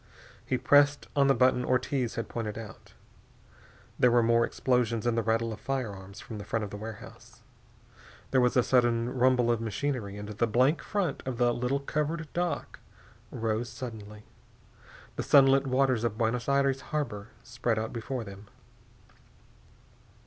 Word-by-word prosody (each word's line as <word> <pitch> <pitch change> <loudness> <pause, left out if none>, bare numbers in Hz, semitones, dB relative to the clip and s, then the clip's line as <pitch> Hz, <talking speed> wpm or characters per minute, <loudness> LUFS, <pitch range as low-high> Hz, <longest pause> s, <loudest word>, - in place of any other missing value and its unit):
He 130 - -1
pressed 145 +2 +4
on 140 -1 +4
the 135 - +4
button 125 +1 +3
Ortiz 130 -1 0
had 115 - -3
pointed 110 -3 -4
out. 115 -2 -10 1.1
There 125 - +5
were 120 0 +4
more 115 +1 +3
explosions 120 -3 0
and 120 -1 +1
the 115 - +1
rattle 115 0 0
of 105 - -9
firearms 105 -7 -5
from 110 -3 -8
the - - -6
front 110 +2 -2
of 100 - -10
the 105 - -6
warehouse. 110 0 -10 0.9
There 130 - +4
was 125 +1 +2
a 125 - +5
sudden 120 -1 +2
rumble 125 -1 +3
of 115 -1 0
machinery 115 -2 -3
and 105 0 -7
the 105 +3 -1
blank 130 +7 +2
front 200 -4 -2
of 130 -2 -3
the 120 -1 +3
little 125 +4 -1
covered 150 +3 -2
dock 175 0 -3 0.5
rose 115 +1 -2
suddenly. 105 -4 -8 0.9
The - - -1
sunlit 135 -1 +5
waters 130 -3 +2
of 115 -2 -1
Buenos 115 +2 -1
Aires 140 -1 +2
harbor 120 -11 -4 0.2
spread 120 -1 -2
out 110 0 -3
before 120 +1 -4
them. 100 0 -11
120 Hz, 155 wpm, -29 LUFS, 110-135 Hz, 1.1 s, There